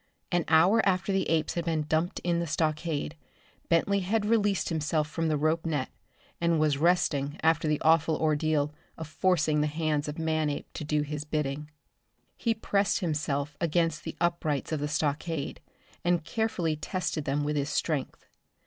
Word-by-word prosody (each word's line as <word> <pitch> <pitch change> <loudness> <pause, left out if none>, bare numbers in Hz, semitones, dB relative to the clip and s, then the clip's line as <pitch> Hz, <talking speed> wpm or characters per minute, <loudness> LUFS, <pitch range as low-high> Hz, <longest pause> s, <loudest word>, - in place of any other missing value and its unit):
An 175 -2 +1
hour 175 +8 +5
after 190 0 +1
the 190 -1 0
apes 160 -2 +1
had 170 -1 -2
been 160 -2 0
dumped 160 +3 0
in 170 -1 +1
the 170 - -2
stockade, 155 0 -1 0.5
Bentley 200 +4 +3
had 205 +3 0
released 205 -5 +2
himself 155 -1 0
from 165 +2 -2
the 155 -1 +1
rope 155 +2 +1
net 150 -5 -2 0.5
and 170 -1 +2
was 150 -2 +2
resting 155 -4 +2
after 160 0 +3
the 150 -1 +1
awful 160 0 +3
ordeal 155 -1 +1 0.2
of 160 - -6
forcing 155 -2 +2
the 150 - +2
hands 155 -1 -1
of 150 - -5
Manape 155 -2 -1
to - - -5
do 150 0 0
his 150 0 -4
bidding. 150 -1 -3 0.7
He 230 -2 0
pressed 205 -2 +1
himself 150 -3 -1
against 165 -1 +1
the - - -6
uprights 170 -5 0
of 155 - 0
the 145 - -1
stockade, 150 +1 -2 0.4
and 175 -2 +2
carefully 180 -8 -1
tested 155 -2 -3
them 145 +2 0
with 150 +1 -1
his 145 0 -1
strength. 150 -3 -2
155 Hz, 165 wpm, -28 LUFS, 150-170 Hz, 0.7 s, hour